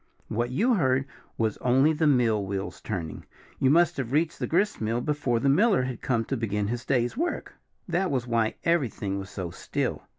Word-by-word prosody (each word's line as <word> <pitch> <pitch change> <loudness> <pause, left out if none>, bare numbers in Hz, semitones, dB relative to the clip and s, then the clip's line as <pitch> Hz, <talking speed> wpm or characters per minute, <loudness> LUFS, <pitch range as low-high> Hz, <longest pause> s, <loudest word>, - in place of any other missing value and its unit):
"What 120 +2 -1
you 220 - +2
heard 130 - +2 0.3
was 110 -1 0
only 135 +5 +3
the 155 0 +1
mill 120 -7 +3
wheels 95 0 -4
turning. 85 -7 -5 0.4
You 130 - +3
must 170 +4 +4
have 130 -3 -3
reached 155 +3 +1
the - - -1
gristmill 140 - +1
before 135 -3 0
the 140 - 0
miller 185 - +4
had 125 -2 -4
come 115 -3 0
to 135 - -2
begin 105 -2 -1
his 120 +1 -3
day's 120 -3 +1
work. 340 +5 -2 0.3
That 185 +2 0
was 130 -4 -1
why 115 -2 0
everything 120 - 0
was 95 0 -7
so 90 -4 -5
still. - - -3
125 Hz, 190 wpm, -27 LUFS, 110-150 Hz, 0.4 s, must